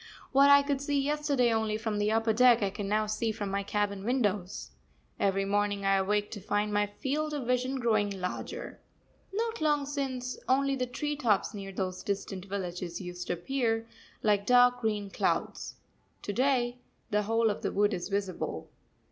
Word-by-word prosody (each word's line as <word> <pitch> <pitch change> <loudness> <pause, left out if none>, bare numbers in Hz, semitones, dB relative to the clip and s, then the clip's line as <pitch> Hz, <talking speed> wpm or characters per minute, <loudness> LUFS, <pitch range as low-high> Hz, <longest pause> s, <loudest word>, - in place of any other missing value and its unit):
What 275 +1 +6
I 280 0 +8
could 280 -1 -1
see 285 0 0
yesterday 280 -4 +1
only 220 -1 0
from 220 -2 -2
the 205 +1 +1
upper 225 0 +2
deck, 240 -1 +5
I 195 - 0
can 205 0 -5
now 215 +1 +1
see 215 +1 -1
from 205 -2 -4
my 200 0 0
cabin 200 -1 -1
windows. 205 -6 -1 0.5
Every 195 0 +1
morning 205 0 0
I 195 0 +4
awake 205 +2 0
to 205 - -6
find 205 +2 -1
my 205 0 +2
field 300 +8 -2
of 275 -4 -3
vision 250 +2 0
growing 215 -4 +2
larger. 180 0 -5 0.5
Not 450 +1 -2
long 295 -2 +2
since, 265 -3 -3
only 275 +1 +3
the 250 -1 -2
tree 295 +4 -3
tops 225 -7 +1
near 195 -2 -6
those 185 -1 -3
distant 195 -2 -4
villages 180 -3 -4
used 180 -1 -6
to - - 0
appear, 225 +4 -1 0.4
like 205 -2 +2
dark 245 0 +5
green 210 -3 -1
clouds. - - -1 0.5
To 205 - -3
day 250 0 +1 0.3
the 210 0 +3
whole 225 +1 +2
of 205 - -5
the - - -1
wood 205 +1 +2
is 175 +2 -4
visible. 195 -2 -3
215 Hz, 180 wpm, -30 LUFS, 200-255 Hz, 0.5 s, I